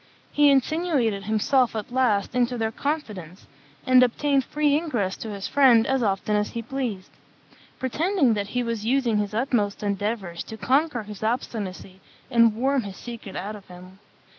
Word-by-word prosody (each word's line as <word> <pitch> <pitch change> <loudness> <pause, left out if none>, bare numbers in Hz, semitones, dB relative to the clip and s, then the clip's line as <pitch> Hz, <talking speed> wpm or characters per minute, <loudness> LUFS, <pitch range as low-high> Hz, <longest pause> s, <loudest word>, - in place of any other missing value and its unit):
He 290 0 +5
insinuated 270 - +1
himself 225 +4 +2
at 215 +1 -5
last 245 -6 +1
into 245 0 +1
their 225 -1 -1
confidence, 210 - -5 0.4
and 255 -1 +6
obtained 270 +3 +2
free 295 +1 +1
ingress 240 - -1
to 225 - -7
his 200 -2 -5
friend 250 -5 +5
as 265 -1 0
often 205 0 0
as 210 0 0
he 230 - -5
pleased; 235 -7 -4 0.7
pretending 295 - +1
that 205 -2 -2
he 245 +3 -2
was 230 -2 -3
using 240 -2 +1
his 210 0 -2
utmost 220 -5 0
endeavours 200 -3 -3
to 220 - -8
conquer 265 0 +1
his 210 -1 -10
obstinacy 205 -5 -4 0.3
and 230 -3 +4
worm 265 +3 +1
his 200 -3 -8
secret 230 -5 -9
out 210 +3 -4
of 200 -2 -13
him. 185 +1 -13
230 Hz, 165 wpm, -24 LUFS, 205-265 Hz, 0.7 s, and